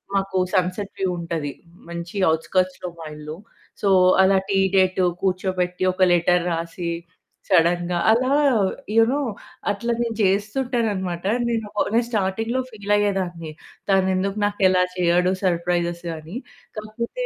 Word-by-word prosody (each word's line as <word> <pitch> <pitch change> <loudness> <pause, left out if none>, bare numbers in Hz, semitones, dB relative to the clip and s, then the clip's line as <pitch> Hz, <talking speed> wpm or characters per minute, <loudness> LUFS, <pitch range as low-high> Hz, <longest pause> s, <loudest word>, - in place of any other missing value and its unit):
మాకు 195 -1 0 0.2
sunset 185 +2 -1
view 190 - +1
ఉంటది. 165 -4 -3 0.4
మంచి 170 +3 -6 0.2
ఔట్‌స్కర్ట్స్‌లో 185 +2 -1
మా 160 - -7
ఇల్లు. 150 +1 -8 0.4
సో 200 - +2 0.3
అలా 190 0 +4
టీ 195 - +2 0.2
డేట్ 185 0 +3 0.2
కూర్చోబెట్టి, 185 -1 -1
ఒక 185 - -6
లెటర్ 175 0 +3
రాసి, 170 +1 -3 0.6
సడెన్‌గా 175 0 +2
అలా 255 +4 +3 0.6
యూ 225 - +7
నో 285 - 0 0.5
అట్లా 220 +4 -1
నేను 230 -2 -2
చేస్తుంటాననమాట. 205 -3 -1 0.2
నేను 225 -2 -1
ఒక - - +3
నేను 235 +1 +3
స్టార్టింగ్‌లో 225 +4 -1
ఫీల్ 205 -2 -2
అయ్యేదాన్ని, 180 -6 -1 0.4
తనెందుకు 190 +1 +1
నాకు 205 0 -2
ఇలా 180 -1 +3
చేయడు, 180 +1 +3
సర్‌ప్రైజెస్ 175 -1 0
అని. 160 +8 -8 0.4
కాకపోతే 235 - -4
185 Hz, 125 wpm, -22 LUFS, 175-205 Hz, 0.6 s, యూ